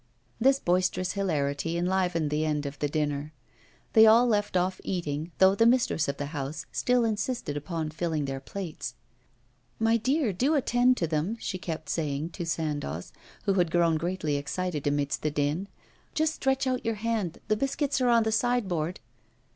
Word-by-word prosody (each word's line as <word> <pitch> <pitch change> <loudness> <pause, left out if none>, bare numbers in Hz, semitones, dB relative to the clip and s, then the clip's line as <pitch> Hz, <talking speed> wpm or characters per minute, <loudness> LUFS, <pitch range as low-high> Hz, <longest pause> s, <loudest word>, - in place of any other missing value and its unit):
This 265 +3 +5
boisterous 185 -1 +1
hilarity 165 -4 -1
enlivened 175 -3 0
the 150 +1 +1
end 150 -2 -1
of 140 +1 -6
the 145 - 0
dinner. 150 0 -2 0.6
They 220 0 +8
all 230 +3 +7
left 205 -5 +1
off 185 +1 0
eating, 160 -3 -3
though 190 0 +6
the 225 +3 +4
mistress 235 -10 +2
of 140 0 -2
the 145 +2 -5
house 145 +1 -4
still 250 -1 +2
insisted 220 - -2
upon 155 +1 -3
filling 160 -2 -1
their 135 -1 -3
plates. 155 -5 -6 0.8
'My 225 +1 +3
dear, 260 0 +1
do 265 - +2
attend 250 -2 +3
to 165 - 0
them,' 160 +8 -1
she 185 - -4
kept 160 -3 -5
saying 150 -1 -2
to 170 -1 -5
Sandoz, 145 - -3 0.3
who 195 - +2
had 180 -3 +2
grown 170 -1 +3
greatly 165 -3 -1
excited 150 +1 -3
amidst 145 -1 0
the 155 - 0
din. 150 +6 -1 0.5
'Just 315 0 +2
stretch 270 -2 0
out 255 -1 -1
your 225 -1 0
hand; 215 -5 -2
the 215 - +2
biscuits 275 +3 -1
are 250 - +3
on 235 -1 +5
the 220 - 0
side 245 0 +1
board. 170 0 -2
175 Hz, 175 wpm, -28 LUFS, 150-225 Hz, 0.8 s, They